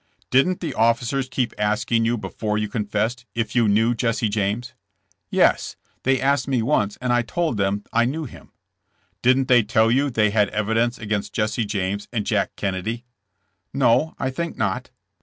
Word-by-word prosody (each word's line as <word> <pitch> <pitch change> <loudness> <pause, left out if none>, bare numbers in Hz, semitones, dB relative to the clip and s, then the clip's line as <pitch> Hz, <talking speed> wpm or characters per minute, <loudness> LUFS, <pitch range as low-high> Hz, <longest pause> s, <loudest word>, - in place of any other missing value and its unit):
''Didn't 175 +8 +3
the 170 - -3
officers 115 +4 +1
keep 125 -2 -1
asking 105 +2 +1
you 120 +1 +1
before 105 +1 -3
you 105 0 -1
confessed, 110 +3 -2
if 115 0 -2
you 120 -2 +4
knew 110 +4 +3
Jesse 115 -1 0
James?" 105 +4 -2 0.6
"Yes; - - +2 0.3
they 135 0 +2
asked 140 +2 +1
me 130 -4 +1
once 105 -6 +1
and 125 -1 0
I 120 - +3
told 160 0 -2
them 100 +1 0
I 120 +1 +3
knew 155 +5 -2
him. 125 - -13 0.2
' - - -49
' - - -43
''Didn't 130 +1 +3
they 125 -2 +6
tell 110 +1 +2
you 140 +4 +2
they 105 -4 +2
had 105 -1 +2
evidence 115 +3 0
against 105 -2 -3
Jesse 110 +1 0
James 100 0 -2
and 110 -4 -2
Jack 105 -4 0
Kennedy?" 105 +5 -3 0.7
"No: 135 +4 +3
I 130 - -2
think 170 +5 -4
not." 100 -3 -2
115 Hz, 175 wpm, -22 LUFS, 105-125 Hz, 0.7 s, they